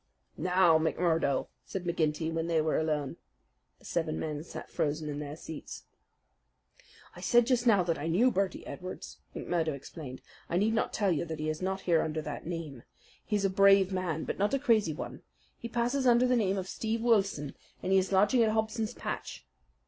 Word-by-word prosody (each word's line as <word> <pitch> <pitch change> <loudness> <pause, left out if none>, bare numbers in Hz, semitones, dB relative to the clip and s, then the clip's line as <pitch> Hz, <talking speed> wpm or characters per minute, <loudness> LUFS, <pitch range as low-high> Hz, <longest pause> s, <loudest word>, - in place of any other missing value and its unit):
"Now, 180 -1 +4
McMurdo!" 160 -3 +1 0.2
said 190 - -5
McGinty 160 -2 0
when 165 0 -1
they 165 -1 +2
were 155 0 +1
alone. 150 -3 -1 0.6
The - - -21
seven 80 - -1
men 150 -1 -3
sat - - -9
frozen 150 +1 -1
in 145 0 -4
their 145 0 -5
seats. 160 -1 -8 1.3
"I - - -10
said 240 -1 +4
just 245 -1 +1
now 205 -5 +5
that 170 -2 -1
I 150 - -3
knew 215 +10 +4
Birdy 195 -2 -1
Edwards," 185 +1 -8 0.2
McMurdo 165 -4 -1
explained. 140 -1 -9 0.3
"I 170 - +1
need 215 +4 +2
not 225 - 0
tell 200 -3 +1
you 165 - 0
that 160 -1 -5
he 155 0 -1
is 155 +2 -3
not 190 +1 -2
here 170 -3 +3
under 155 0 -2
that - - -6
name. 160 -7 -5 0.4
He's 205 -2 0
a - - +3
brave 195 0 +5
man, 175 -4 -1
but - - -4
not 205 +7 +2
a - - +2
crazy 225 - +2
one. - - -7 0.4
He 235 - -6
passes 245 +3 0
under 240 +1 +5
the 250 0 +3
name 200 -4 +1
of 190 -1 -3
Steve 225 +3 -2
Wilson, 195 - +1 0.3
and 185 - -1
he 190 - +6
is 190 +1 -2
lodging 205 +6 +4
at 225 - +4
Hobson's 220 +1 -1
Patch." - - -5
180 Hz, 195 wpm, -30 LUFS, 160-215 Hz, 1.3 s, he